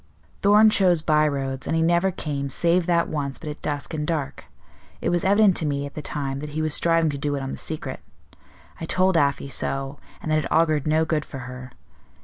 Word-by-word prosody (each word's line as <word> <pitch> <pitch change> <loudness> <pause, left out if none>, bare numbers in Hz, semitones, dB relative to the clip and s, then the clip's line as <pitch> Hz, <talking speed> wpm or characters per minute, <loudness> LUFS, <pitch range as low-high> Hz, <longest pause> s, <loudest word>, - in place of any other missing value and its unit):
"Thorn 210 +2 +6
chose 180 -6 +3
by 155 -1 +3
roads, 135 -2 -3
and - - 0
he 165 - +2
never 175 +3 +3
came, 140 -6 -4
save 170 +5 +1
that 170 -1 +2
once, 140 -3 -3
but 155 - -7
at 150 - -10
dusk 145 +2 -3
and 150 -1 -3
dark. 155 -5 -3 0.5
It - - -1
was 175 -1 0
evident 200 0 +4
to 160 - -1
me 140 -1 -1
at 140 - -8
the 150 - -6
time 140 -2 -4
that 150 +1 -6
he - - 0
was 155 -1 0
striving 165 -1 +3
to 140 - -5
do 145 0 -1
it 140 - -4
on 135 - -4
the - - -5
secret. 155 -1 -5 0.8
I 165 - -4
told 185 +2 +2
Afy 140 -3 +1
so, 135 +1 -2 0.2
and 155 - -4
that 155 - +3
it 150 - -5
augured 155 -2 +2
no 155 +1 +2
good 155 -1 0
for 135 - -9
her. 125 0 -9
155 Hz, 225 wpm, -24 LUFS, 140-170 Hz, 0.8 s, Thorn